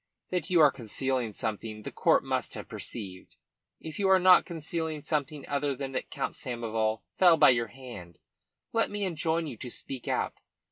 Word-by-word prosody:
That 180 -4 -1
you 175 -3 +5
are 150 -2 +7
concealing 125 0 -2
something 110 +1 -4
the - - -6
court - - +3
must - - -2
have - - -7
perceived. 95 -5 -7 0.4
If 160 +2 -7
you 195 -1 +2
are 190 - +7
not 185 0 +6
concealing 160 -2 -3
something 150 -2 -2
other 145 -1 0
than 135 0 -4
that 130 - -3
Count - - -3
Samoval 110 -2 -2 0.2
fell 175 -3 +7
by 145 - +8
your 120 -2 +1
hand, 105 -8 -10 0.6
let 225 0 +2
me 205 0 -3
enjoin 165 -1 0
you 135 -7 -6
to 125 - -6
speak 130 +1 -7
out. - - -1
140 Hz, 180 wpm, -29 LUFS, 115-165 Hz, 0.6 s, by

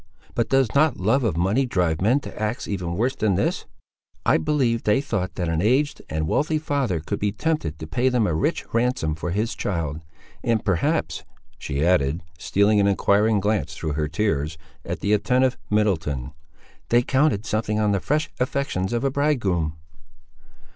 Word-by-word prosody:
But 115 - 0
does 135 -4 +2
not 145 -1 +3
love 110 +8 +2
of 105 -9 0
money 105 +10 +2
drive 90 -8 0
men 120 +8 +3
to 110 - -9
acts 110 +3 -2
even 90 -4 -3
worse 125 +5 +1
than 105 -6 +1
this? 100 - -1 0.6
I - - +4
believe 115 - +1
they 105 +4 +2
thought 100 -10 -3
that 90 - -2
an 80 0 0
aged 145 +8 +1
and 80 0 -2
wealthy 155 - +1
father 140 - -1
could 100 +6 -4
be 105 -1 0
tempted 110 - -2
to 80 - -7
pay 120 +12 +1
them 125 -4 +2
a 85 - 0
rich 80 - 0
ransom 115 -9 +1
for 80 +3 -4
his 105 +6 -1
child; 80 -6 -3 0.4
and, 115 -3 0
perhaps," 95 -5 0 0.4
she 70 +3 -1
added, 85 -3 +2 0.2
stealing 100 +1 +3
an 100 - +3
enquiring 100 +2 +3
glance 100 -7 -1
through 80 -2 -3
her 75 0 -1
tears, 80 -3 -1 0.3
at - - -5
the 100 - +1
attentive 125 +5 +2
Middleton, 80 - 0 0.6
"they 120 +1 +4
counted 130 -5 +1
something 110 0 -1
on 105 -1 +2
the 100 - +1
fresh 150 - -1
affections 125 -7 -1
of 120 +1 0
a 135 - +1
bridegroom." 100 - 0
105 Hz, 175 wpm, -23 LUFS, 85-125 Hz, 0.6 s, I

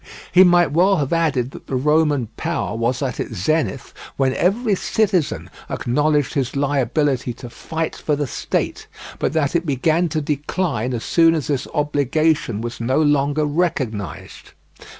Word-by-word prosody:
He 180 +1 +7
might 175 -3 +4
well 185 +6 +4
have 145 0 -1
added 145 -7 +1
that - - -12
the 135 - -3
Roman 150 -1 +2
power 105 - -2
was 120 +4 -1
at 130 -3 -3
its 115 - -4
zenith 140 - -1 0.2
when 135 -1 +2
every 205 - +1
citizen 190 -4 0 0.2
acknowledged 145 +3 0
his 135 -4 -1
liability 140 -2 0
to 120 0 -10
fight 160 +4 -4
for 150 - -1
the 145 0 -1
State, 125 - -3 0.3
but - - -1
that 155 -1 0
it 170 - +2
began 160 +4 +1
to 155 - -1
decline 145 - -2
as 115 - -4
soon 165 -1 +4
as 155 - -2
this 140 -2 -2
obligation 145 -4 +1
was 120 0 -5
no 130 +5 +1
longer 145 0 +2
recognised." 145 - -3
145 Hz, 155 wpm, -20 LUFS, 130-160 Hz, 0.3 s, He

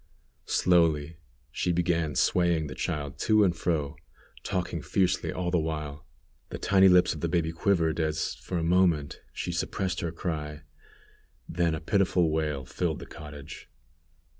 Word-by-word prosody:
Slowly 80 -3 +2 0.3
she 90 - -1
began 85 -3 0
swaying 85 -1 +2
the 70 - -6
child 70 +1 -4
to 110 -1 +4
and 90 -4 +2
fro, 80 -4 -1 0.4
talking 90 -3 -2
fiercely 95 +2 0
all 90 -1 -2
the 90 - +3
while. 75 -2 -4 0.4
The - - -5
tiny 95 -1 +5
lips 90 -1 +5
of 75 - -8
the 85 - 0
baby 80 -1 +1
quivered, 85 -2 +1
as, 80 -1 -1
for 90 - -5
a 85 - -1
moment, 85 -4 +2
she - - -4
suppressed 90 -3 -2
her 85 - -2
cry, 75 -3 -4 0.8
then 85 -1 0
a - - -4
pitiful 90 -1 +2
wail 75 -4 -1
filled 80 +4 -2
the - - -9
cottage. 75 -1 -10
80 Hz, 150 wpm, -28 LUFS, 75-90 Hz, 0.8 s, tiny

